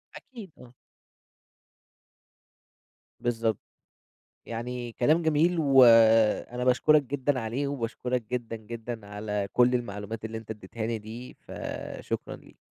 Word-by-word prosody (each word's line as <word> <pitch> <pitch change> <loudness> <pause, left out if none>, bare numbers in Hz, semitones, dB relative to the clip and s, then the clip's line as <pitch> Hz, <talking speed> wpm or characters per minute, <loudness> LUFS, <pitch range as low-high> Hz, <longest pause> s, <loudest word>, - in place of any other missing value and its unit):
أكيد، 225 -8 -11
آه. 125 0 -14 2.5
بالضبط. 115 -3 -1 0.9
يعني 120 +1 -5
كلام 150 +9 +2
جميل 160 +2 +2
وأنا 120 -4 +5
باشكرك 150 +4 +4
جدًا 135 0 -1
عليه، 120 +5 -2
وباشكرك 125 -2 -3
جدًا 120 -2 -3
جدًا 115 0 -7
على 105 -1 -3
كل 125 0 +4
المعلومات 110 -1 -4
اللي 110 0 -5
أنت 110 0 -8
اديتها 110 +1 -6
لي 115 -1 -1
دي 115 +4 -9
فشكرًا - - -6
ليك. - - -18
120 Hz, 110 wpm, -27 LUFS, 110-130 Hz, 2.5 s, وأنا